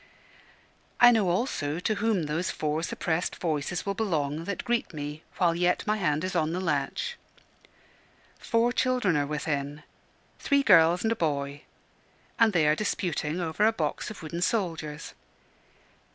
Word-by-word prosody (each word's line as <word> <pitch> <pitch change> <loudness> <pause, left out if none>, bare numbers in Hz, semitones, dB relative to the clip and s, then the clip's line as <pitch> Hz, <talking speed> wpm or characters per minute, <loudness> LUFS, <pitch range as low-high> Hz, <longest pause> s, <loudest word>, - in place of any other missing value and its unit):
I 245 0 +9
know 215 -6 +2
also 175 - -1
to 215 - 0
whom 215 -6 +1
those 155 +4 -2
four 155 +1 -2
suppressed 170 0 -2
voices 160 +1 -2
will 200 - -1
belong 160 -7 -1
that 200 +1 -4
greet 235 -7 -1
me 150 +1 -5 0.2
while 175 -2 +3
yet 175 +1 +1
my 215 0 +1
hand 155 -5 0
is 185 0 -3
on 160 -1 +1
the 180 - -1
latch. 170 - -2 1.2
Four 235 +1 +1
children 250 -9 +1
are 145 -1 +1
within 145 -1 -3 0.6
three 280 -1 +2
girls 175 -5 +5
and 225 - +1
a - - +1
boy 145 -5 -2 0.7
and 225 -1 +5
they 165 -6 +3
are 150 - +5
disputing 170 -4 -2
over 170 +3 -1
a - - +4
box 160 -9 -3
of 210 -5 -9
wooden 170 +2 -5
soldiers. 165 -7 -2
170 Hz, 150 wpm, -27 LUFS, 150-210 Hz, 1.2 s, I